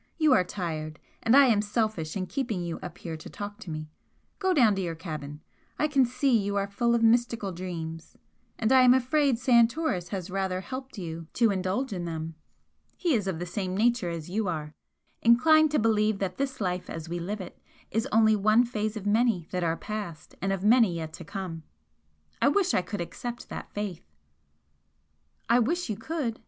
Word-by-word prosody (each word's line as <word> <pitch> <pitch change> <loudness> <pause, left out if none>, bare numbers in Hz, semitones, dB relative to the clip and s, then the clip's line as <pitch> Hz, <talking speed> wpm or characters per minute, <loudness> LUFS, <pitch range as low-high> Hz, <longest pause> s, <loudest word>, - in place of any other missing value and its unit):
You 310 -4 +4
are 185 - +5
tired, 160 -5 -4 0.2
and 225 +4 +5
I 280 - +8
am 220 -5 +4
selfish 210 -6 -1
in 185 - -2
keeping 225 -7 -2
you 170 -1 -4
up 175 -1 -8
here 165 -2 -6
to 155 - -10
talk 205 +1 -7
to 190 - -9
me. 155 -1 -6 0.5
Go 380 -2 +1
down 245 - +5
to 195 - -2
your 170 -3 -3
cabin. 155 -3 -7 0.4
I 305 - +2
can 275 -3 +3
see 255 +1 +2
you 200 -2 0
are 200 -1 +1
full 235 +4 +1
of 230 - +1
mystical 230 -3 +2
dreams, 165 -2 -6 0.4
and 225 +1 0
I 260 -1 +7
am 250 0 +7
afraid 260 0 +2
Santoris 235 - +2
has 185 -2 -5
rather 190 -1 -1
helped 260 +3 -7
you 165 -3 -6
to 230 -3 +3
indulge 195 +6 -1
in 175 -2 -4
them. 165 -1 -4 0.6
He 345 -4 +1
is 210 -5 0
of 190 -4 -1
the 175 - -4
same 185 +1 -3
nature 235 -3 +2
as 165 -2 -5
you 205 +3 -1
are 155 -3 -3 0.5
inclined 310 +7 +6
to 300 - +1
believe 215 -1 +2
that 190 -2 -3
this 270 -1 -2
life 180 -3 -2
as 165 0 -6
we 175 +1 -3
live 200 +5 -4
it 180 -2 -9 0.3
is 225 +2 0
only 220 0 +5
one 215 +4 +4
phase 215 -2 -2
of 205 - -7
many 215 -4 +2
that 180 -1 -1
are 165 0 0
past 205 -7 -6
and 195 +1 0
of 195 -1 -2
many 220 -4 +5
yet 160 -1 -5
to - - -8
come. 190 -5 -6 0.8
I - - +5
wish 390 -3 +2
I - - +3
could 205 0 -5
accept 240 +8 -6
that - - -7
faith!" 205 - -5 1.4
"I 235 +2 +5
wish 315 +3 0
you - - -2
could!" 240 0 -3
205 Hz, 200 wpm, -28 LUFS, 175-240 Hz, 1.4 s, I